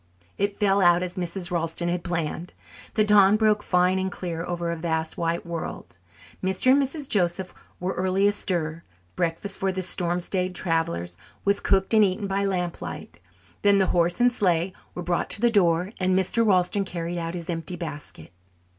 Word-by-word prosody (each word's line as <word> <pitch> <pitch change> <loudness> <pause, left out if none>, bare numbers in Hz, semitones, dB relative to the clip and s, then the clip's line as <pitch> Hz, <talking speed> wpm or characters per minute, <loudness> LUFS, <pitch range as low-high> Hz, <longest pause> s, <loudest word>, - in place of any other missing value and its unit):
It 200 0 0
fell 200 -1 +3
out 175 0 +5
as 180 0 -5
Mrs. 180 0 -4
Ralston 170 0 -1
had 175 0 -1
planned. 170 0 -3 0.4
The 215 - +4
dawn 210 -1 +6
broke 215 -1 +3
fine 180 0 +2
and 190 0 -2
clear 170 -2 -4
over 175 -1 -3
a - - -2
vast 160 -1 -2
white 170 +1 -2
world. 170 -1 -6 0.4
Mr. 190 +7 +2
and 280 +2 +5
Mrs. 280 +1 -3
Joseph 180 -3 0 0.3
were 180 +1 -2
early 190 +2 +1
astir; 175 -6 0 0.3
breakfast 170 +4 -1
for 190 0 +1
the 185 0 -3
storm 175 -1 -1
stayed 185 +1 -2
travellers 90 - -1 0.3
was 200 0 +3
cooked 190 +2 +1
and 215 -1 +6
eaten 200 +1 0
by 195 0 0
lamplight; 180 - -4 0.4
then 200 -1 +5
the 190 - +4
horse 175 +3 +2
and 245 0 +5
sleigh 185 -5 +1 0.2
were 180 - -4
brought 175 0 -1
to - - +2
the 240 -1 +4
door 180 -2 +2
and 185 0 +2
Mr. 190 +5 +2
Ralston 195 -1 +2
carried 175 -2 -4
out 165 +1 -4
his 170 -1 -6
empty 170 0 -4
basket. 150 - -8
180 Hz, 180 wpm, -25 LUFS, 170-195 Hz, 0.4 s, dawn